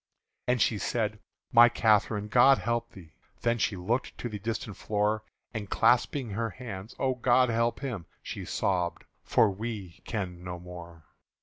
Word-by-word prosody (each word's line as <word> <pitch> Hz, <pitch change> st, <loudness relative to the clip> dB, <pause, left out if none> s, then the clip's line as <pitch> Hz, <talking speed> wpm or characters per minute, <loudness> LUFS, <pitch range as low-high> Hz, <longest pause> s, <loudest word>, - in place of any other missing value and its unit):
And 125 Hz, 0 st, +2 dB
she 110 Hz, -1 st, +2 dB
said, 110 Hz, -2 st, -1 dB, 0.3 s
"My 120 Hz, 0 st, +8 dB
Catherine, 105 Hz, -2 st, +2 dB
God 125 Hz, +5 st, +6 dB
help 120 Hz, 0 st, -1 dB
thee!" 80 Hz, -5 st, -13 dB, 0.3 s
Then 115 Hz, 0 st, +1 dB
she 110 Hz, -, +1 dB
looked 115 Hz, +9 st, -2 dB
to 120 Hz, -, -4 dB
the 105 Hz, -2 st, -5 dB
distant 110 Hz, -1 st, -4 dB
floor, 105 Hz, +1 st, 0 dB, 0.3 s
And 105 Hz, -3 st, -5 dB
clapsing 125 Hz, 0 st, +2 dB
her 115 Hz, +3 st, -1 dB
hands, 110 Hz, -3 st, -8 dB
"O 130 Hz, -1 st, +1 dB
God 125 Hz, 0 st, +3 dB
help 115 Hz, +2 st, 0 dB
him," 115 Hz, -, -4 dB, 0.2 s
She -, -, -6 dB
sobbed, 90 Hz, -3 st, -1 dB, 0.2 s
"for 110 Hz, -, +3 dB
we 100 Hz, -4 st, -6 dB
can 90 Hz, -6 st, -4 dB
no 90 Hz, -1 st, -5 dB
more!" 85 Hz, -2 st, -11 dB
110 Hz, 160 wpm, -29 LUFS, 95-120 Hz, 0.3 s, My